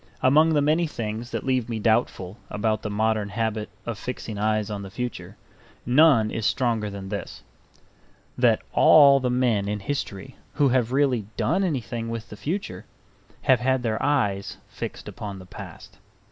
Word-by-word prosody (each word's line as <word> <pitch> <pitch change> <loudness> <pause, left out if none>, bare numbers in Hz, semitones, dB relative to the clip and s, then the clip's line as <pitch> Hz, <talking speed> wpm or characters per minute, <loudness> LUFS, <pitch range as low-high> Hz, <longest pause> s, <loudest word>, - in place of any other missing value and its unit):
Among 155 +5 +5
the 145 - +3
many 160 +3 +2
things 115 -3 -5
that - - -4
leave 130 -3 0
me 115 - -2
doubtful 110 -3 0
about 110 +1 -1
the 105 - -4
modern 110 0 0
habit 110 0 -2 0.2
of 115 -3 -4
fixing 115 -4 -5
eyes 110 0 0
on 100 -1 -4
the 100 - -8
future, 125 +5 -6 0.5
none 125 -4 +5
is 115 - -3
stronger 115 -3 0
than 100 -1 -7
this: 100 - -6 0.9
that - - +3
all 140 -3 +7
the 125 -1 -1
men 120 -5 +1
in 105 0 -2
history 125 0 -5 0.2
who 145 -2 +3
have 125 -2 +1
really 130 -6 +1
done 185 +4 +1
anything 120 - -3
with 115 0 -5
the - - -8
future 110 - -4 0.6
have 130 -2 +4
had 130 0 +1
their 110 -1 -1
eyes 105 -9 0
fixed - - -7
upon 100 -2 -7
the 95 - -11
past. - - -11
115 Hz, 165 wpm, -25 LUFS, 105-130 Hz, 0.9 s, all